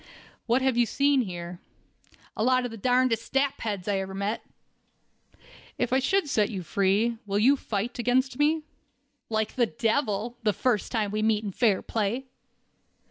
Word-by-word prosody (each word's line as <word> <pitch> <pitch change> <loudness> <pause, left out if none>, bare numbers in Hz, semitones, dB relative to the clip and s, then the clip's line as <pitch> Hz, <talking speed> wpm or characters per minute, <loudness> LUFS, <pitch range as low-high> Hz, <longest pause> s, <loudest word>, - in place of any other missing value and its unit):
"What 245 +3 +2
have 265 -3 +2
you 240 -1 +4
seen 280 +1 +2
here?" 175 -4 -6 0.8
"A 215 - -1
lot 255 +1 +3
of 245 - -4
the - - -7
darndest 245 0 +1
sapheads 225 -8 -1
I 200 -2 +1
ever 190 0 -5
met." 200 +3 -2 1.4
"If 245 0 -1
I 260 - +4
should 375 +6 +1
set 210 -7 +1
you 190 -5 -5
free, 200 +6 +1
will 200 0 0
you 255 +7 +5
fight 230 -1 -4
against 250 +2 +1
me?" 305 +2 +2 0.7
"Like 220 -1 -1
the 240 -3 +2
devil, 230 0 -1
the 215 -3 +1
first 225 -4 0
time 215 -4 0
we 215 +1 -1
meet 215 0 +2
in 205 - -3
fair 210 -1 +2
play." 230 +4 -2
230 Hz, 165 wpm, -27 LUFS, 205-255 Hz, 1.4 s, you